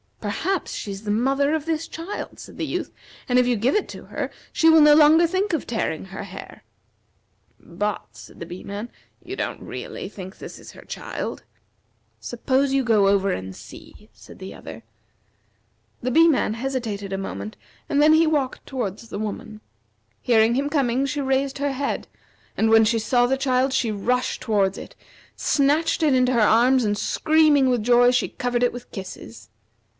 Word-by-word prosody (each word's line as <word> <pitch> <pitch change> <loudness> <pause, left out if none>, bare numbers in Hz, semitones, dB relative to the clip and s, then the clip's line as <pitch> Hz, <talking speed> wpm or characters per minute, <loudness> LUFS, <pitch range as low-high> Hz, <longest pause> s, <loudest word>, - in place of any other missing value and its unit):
"Perhaps 345 - -2
she 205 - -5
is 195 +1 -7
the 205 - -2
mother 270 +6 +1
of 315 -2 -1
this 325 0 -2
child," 335 +5 -7
said - - -11
the - - -2
Youth, - - -4 0.4
"and 250 0 +3
if 250 - +3
you 245 - +2
give 235 +6 +1
it 420 - +1
to - - -9
her - - -4 0.2
she 325 - +3
will 320 -1 +7
no 300 0 +7
longer 315 +2 +6
think 375 +4 -1
of 315 - -1
tearing 220 -9 -3
her 190 +1 -7
hair." 190 -1 -10 1.0
"But," 205 +4 -4
said - - -14
the 170 - -6
Bee 175 +2 -9
man, 205 +4 -6 0.3
"you 365 +2 -6
don't - - -4
really - - -7
think 190 -2 -10
this - - -9
is - - -12
her - - -13
child?" - - -6 0.8
"Suppose 265 +3 0
you 270 0 +2
go 215 -5 +3
over 195 0 +2
and 95 0 -5
see," 105 - -14
said 110 +2 -15
the 190 0 -8
other. - - -10 1.2
The 255 - -1
Bee 330 +5 +6
man 275 -8 +2
hesitated 230 -6 -4
a 195 - -2
moment, 105 - -6 0.3
and 285 - +1
then 305 +1 +6
he 320 +1 +4
walked 285 -4 -1
toward 220 -7 -3
the 220 -3 -8
woman. 215 0 -6 0.6
Hearing 225 -1 +3
him 280 +3 0
coming, 270 -2 +1
she 290 +1 -2
raised 270 0 0
her 285 -1 -1
head, 280 +1 -3 0.5
and 220 - +2
when 225 0 +6
she 225 +1 +2
saw 245 +2 +2
the 265 +2 +1
child 260 0 +1
she 245 -4 +1
rushed 245 +5 -1
towards 200 -3 +1
it, - - -10 0.4
snatched 305 +4 +1
it 300 -3 +4
into 255 0 +3
her 235 - +2
arms, 245 +4 +4
and 205 0 0
screaming 305 +1 +3
with 245 -4 +1
joy 245 +1 +5
she 250 - +1
covered 245 -1 -2
it 245 - +2
with 245 0 -10
kisses. 115 - -9
245 Hz, 185 wpm, -23 LUFS, 210-280 Hz, 1.2 s, will